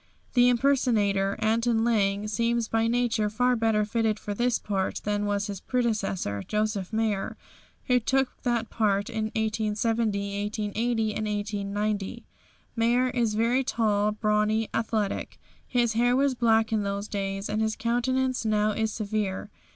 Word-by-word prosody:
The 245 -1 +5
impersonator, 225 -7 +2
Anton 225 +1 +1
Lang, 205 -3 +1
seems 230 +2 0
by 225 0 +1
nature 230 -3 +1
far 250 +4 +2
better 225 -2 +2
fitted 220 0 0
for 205 - -5
this 240 +2 +1
part 195 -2 -2
than 205 0 -1
was 200 0 0
his 200 -2 -5
predecessor, 210 - -1
Josef 210 - -2
Mayr, 220 -3 -1 0.5
who 250 -2 +3
took 265 +2 0
that 240 -3 -1
part 205 0 +1
in 220 -2 -1
1870, 215 -1 0
1880, 220 +1 -1
and 215 +1 -2
1890. 205 +1 -2 0.5
Mayr 240 +2 +2
is 230 -4 0
very 235 +4 +2
tall, 210 -4 +1
brawny, 215 +1 +1
athletic. 220 -3 -2 0.3
His 240 -3 +1
hair 245 +2 +3
was 275 0 +2
black 225 -2 +2
in 215 - +2
those 200 +1 -3
days, 195 -1 -3
and 210 +1 -1
his 220 0 0
countenance 255 +3 0
now 215 -1 +2
is 220 +1 -1
severe. 210 -2 -3
220 Hz, 145 wpm, -27 LUFS, 205-235 Hz, 0.5 s, The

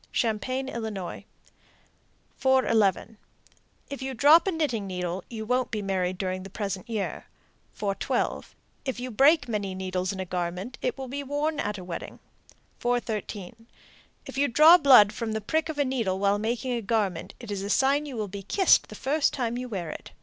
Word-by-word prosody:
Champaign, 255 +4 -1
Ill. 235 -4 -4 1.5
411. 225 -6 +2 0.7
If 280 - -5
you 265 0 -4
drop 310 - +6
a - - +2
knitting 280 - -1
needle, 180 0 -3
you 220 -2 -6
won't 250 +2 0
be 215 -2 -3
married 185 -2 -1
during 185 -1 -2
the 195 - -9
present 195 +2 -4
year. 215 -4 -3 0.5
412. 200 -2 -2 0.3
If 265 -3 -3
you 250 0 -5
break 285 +6 +4
many 205 -4 -2
needles 185 -1 -2
in 195 - -6
a 190 - -2
garment, 180 +6 -4
it 250 - -1
will 265 -1 -6
be 280 +3 -4
worn 290 +2 -2
at 210 0 -2
a 185 - -8
wedding. 175 -1 -7 0.6
413. 225 -3 -3 0.6
If - - -6
you 285 - +3
draw 310 +8 +8
blood 250 -8 +7
from 220 -2 -3
a - - 0
prick 315 +9 -1
of 315 - -3
the 285 -1 +1
needle 230 -8 -1
while 200 +1 +2
making 235 +4 -2
a 240 -1 -1
garment, 200 -5 -1
it 235 -4 -8
is 200 -1 -3
a 200 - -4
sign 275 +6 +2
you 265 -4 -6
will 215 -2 -2
be 200 +1 -7
kissed 375 - +3
the - - -9
first 285 +3 +1
time 240 -3 -2
you 250 0 -5
wear 180 -7 -4
it. - - -10
225 Hz, 185 wpm, -27 LUFS, 195-265 Hz, 1.5 s, draw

